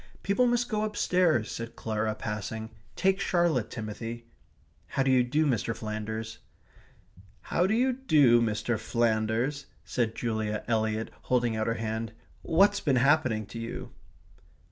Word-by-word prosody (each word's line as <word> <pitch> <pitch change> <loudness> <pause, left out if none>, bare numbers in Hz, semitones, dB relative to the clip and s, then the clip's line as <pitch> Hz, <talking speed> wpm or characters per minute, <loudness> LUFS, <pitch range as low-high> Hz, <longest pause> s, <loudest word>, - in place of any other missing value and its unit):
"People 225 +6 +3
must 240 0 +1
go 215 -3 -1
downstairs," 180 - +1
said 115 0 -6
Clara, 110 -1 -2
passing. 110 +1 -5 0.2
"Take 190 +1 +2
Charlotte, 170 - +1
Timothy. 115 +1 -6 0.6
How 135 - 0
d'you 130 -1 +4
do, 145 +6 +1
Mr. 115 -4 0
Flanders." 110 +1 -5 1.0
"How 180 - +1
d'you 245 +5 +2
do, 150 - +4
Mr. 110 0 0
Flanders," 115 +5 0 0.2
said 115 -2 -1
Julia 110 -2 -2
Eliot, 110 -1 0
holding 120 -3 +1
out 110 0 -1
her 115 - +1
hand. 110 0 -3 0.3
"What's 200 +5 +3
been 140 -4 +1
happening 130 -4 +3
to 115 - -8
you?" 115 +1 -6
115 Hz, 130 wpm, -28 LUFS, 110-155 Hz, 1.0 s, d'you